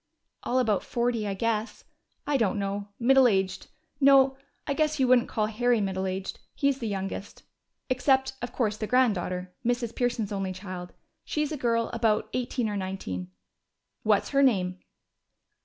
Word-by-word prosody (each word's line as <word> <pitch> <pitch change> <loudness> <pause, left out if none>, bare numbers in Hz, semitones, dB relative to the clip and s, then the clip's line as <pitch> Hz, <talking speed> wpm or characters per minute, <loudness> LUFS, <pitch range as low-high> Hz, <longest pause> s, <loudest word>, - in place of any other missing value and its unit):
"All 250 - -1
about 220 -6 +2
forty, 235 -3 -1
I 195 - -2
guess. 225 +1 -2 0.4
I 290 - 0
don't 220 -7 +2
know. 200 0 -3
Middle 260 +1 +6
aged 190 -3 0 0.3
no, 270 -1 +6 0.3
I 280 - 0
guess 305 +1 0
you 260 - +3
wouldn't 245 -1 +4
call 215 -2 0
Harry 235 +2 +1
middle 190 -1 -1
aged. 190 +1 -4 0.2
He's 280 -1 +1
the 230 - -3
youngest. 195 0 -5 0.4
Except, 265 +1 +2
of 245 - -4
course, 215 -4 -1
the 215 - -3
granddaughter 185 -7 +1
Mrs. 240 -1 -1
Pearson's 240 -4 -1
only 195 -2 -2
child. 185 -1 -7 0.3
She's 300 0 -2
a - - -1
girl 230 -4 0
about 225 -2 +1
eighteen 250 -1 -1
or 210 - -2
nineteen." 185 - -4 0.7
"What's 210 -2 +2
her 275 -1 +3
name?" 185 -8 +2
225 Hz, 155 wpm, -27 LUFS, 195-255 Hz, 0.7 s, Middle